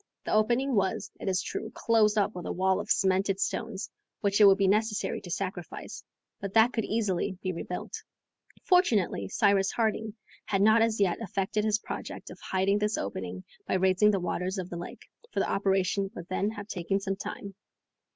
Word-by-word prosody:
The - - -1
opening 240 +5 +2
was, 190 -4 0
it - - -2
is 185 0 0
true, 220 - -4
closed 220 -2 +3
up 210 +1 +2
with 180 - -6
a - - -2
wall 190 +1 +1
of 210 +1 -6
cemented 190 0 +2
stones, 220 -1 -2 0.3
which 200 0 +2
it - - +10
would 195 -1 +7
be 195 -1 +2
necessary 210 +2 0
to 180 - -10
sacrifice, 185 -1 -5 0.4
but 200 +1 -6
that 225 +3 +6
could 225 - -1
easily 195 -4 -1
be 185 -1 -1
rebuilt. 180 +1 -6 0.7
Fortunately, 225 - +2
Cyrus 200 - +2
Harding 220 -1 -1 0.3
had 195 -1 +1
not 220 +2 +6
as 225 -1 +2
yet 185 -4 +2
effected 200 0 -1
his 215 -1 +3
project - - -7
of - - -11
hiding 195 +2 +1
this 210 +1 0
opening 95 -2 -4 0.2
by - - +1
raising 190 +2 +4
the 200 -2 +2
waters 180 +2 -2
of 185 -1 -5
the - - -4
lake, 175 - -8 0.3
for - - -1
the - - 0
operation 195 0 +1
would 175 - -8
then 195 +2 0
have 205 -2 -7
taken 195 0 -1
some 195 0 -2
time. 200 0 -7
200 Hz, 190 wpm, -28 LUFS, 185-215 Hz, 0.7 s, it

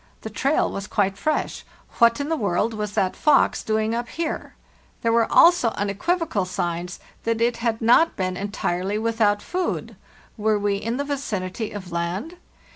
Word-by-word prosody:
The 220 - -7
trail 275 +8 +1
was 195 +1 -5
quite 195 -3 +1
fresh. 305 +8 -2 0.4
What 235 +1 +5
in 285 - -2
the 325 - +1
world 210 - 0
was 210 -1 -4
that 185 -2 0
fox 300 -2 +3
doing 220 0 0
up 240 +1 -3
here? 330 -1 -4 0.5
There 230 - +2
were 230 0 +2
also 345 -8 +6
unequivocal 210 - 0
signs 175 -1 -3 0.2
that 230 0 0
it 235 0 +1
had 230 -1 -1
not 285 +9 +5
been 185 -2 -2
entirely 195 0 -2
without 220 -2 +1
food. 365 0 -3 0.4
Were 215 0 +2
we 205 -1 0
in 230 +4 -3
the 285 - -1
vicinity 220 -7 -3
of 190 -4 -8
land? 180 - -3
220 Hz, 165 wpm, -23 LUFS, 200-240 Hz, 0.5 s, also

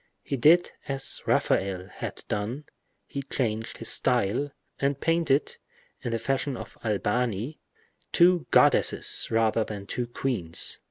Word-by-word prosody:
He - - -3
did 160 +7 +4 0.2
as 135 0 0
Raphael 95 -1 +1
had - - -7
done—he 125 +5 -6
changed 110 -3 -2
his 115 - 0
style, 125 +3 +1 0.3
and 140 0 0
painted, 165 -4 +1 0.4
in - - -3
the 115 - -1
fashion 135 +3 -2
of - - -9
Albani, 115 +4 -1 0.5
two 175 -1 +4
goddesses - - +5
rather 115 0 +2
than 105 -2 -7
two 120 +4 -3
queens. 115 -9 -2
120 Hz, 120 wpm, -27 LUFS, 110-140 Hz, 0.5 s, goddesses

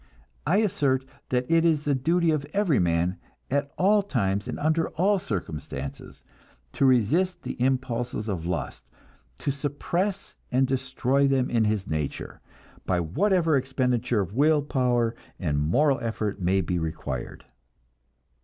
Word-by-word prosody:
I 180 - +4
assert 140 -9 +1 0.2
that 125 0 +1
it 165 0 +3
is 155 -3 +2
the 145 - +2
duty 165 +5 +2
of 155 -2 0
every 195 -9 +2
man, 85 +1 +1 0.3
at 140 +1 0
all 205 +3 +4
times 100 - -1
and - - -4
under 160 +2 +1
all 195 +4 +2
circumstances, 80 - -6 0.5
to 135 - +3
resist 165 - +2
the - - -4
impulses 125 -3 -1
of 90 -5 -3
lust, 85 -4 -4 0.5
to - - -1
suppress 170 +8 -2 0.2
and 130 +2 +3
destroy 130 +1 +1
them 135 -2 +1
in 115 -2 +3
his 105 -2 0
nature, 75 -2 -4 0.5
by 90 -1 +2
whatever 165 - +2
expenditure 125 -3 +1
of 95 0 -5
will 150 +3 +3
power 125 -4 +1 0.3
and 75 -6 0
moral 130 - +2
effort 110 -3 -3
may 95 +2 +2
be 90 0 -1
required. 75 -6 -5
130 Hz, 140 wpm, -26 LUFS, 100-155 Hz, 0.5 s, I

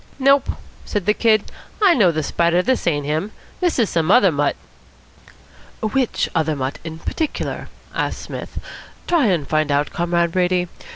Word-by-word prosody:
"Nope," 275 +1 +3 0.3
said 205 -4 -3
the 210 - +4
Kid. 215 -2 +3 0.4
"I 400 -4 +6
know 205 - +4
the 155 -1 -2
Spider. 170 +4 +2
This 260 -4 0
ain't 145 -4 +1
him. 155 +8 -1 0.3
This 355 -2 +1
is 230 -4 +3
some 165 0 0
other 200 -3 +6
mutt." 145 -1 0 1.2
"Which 240 +3 0
other 160 -2 +1
mutt 135 0 -3
in 160 -1 -6
particular?" 305 - -3 0.2
asked - - -2
Psmith. - - -7 0.5
"Try 330 -8 +3
and 170 -8 0
find 155 -1 +1
out, 145 +1 +1
Comrade 170 0 +1
Brady. 180 0 +1
180 Hz, 160 wpm, -20 LUFS, 160-230 Hz, 1.2 s, I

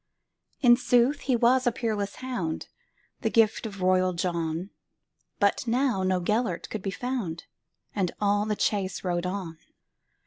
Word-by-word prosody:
In 240 -3 +7
sooth 250 +3 +3
he 260 - +1
was 250 +2 +3
a - - +4
peerless 215 -4 -2
hound, 245 -12 -4 0.5
The 225 - 0
gift 225 0 +3
of 195 -3 -7
royal 185 0 +3
John; 170 +1 -2 0.7
But 200 +4 +2
now 245 -3 +1
no 185 -1 +1
Gêlert 210 0 -1
could 215 - -3
be 195 - -3
found, 200 -7 -3 0.5
And 190 -4 0
all 205 0 +2
the 210 - 0
chase 195 -3 -1
rode 175 -1 -1
on. 180 -4 -5
205 Hz, 145 wpm, -27 LUFS, 185-240 Hz, 0.7 s, In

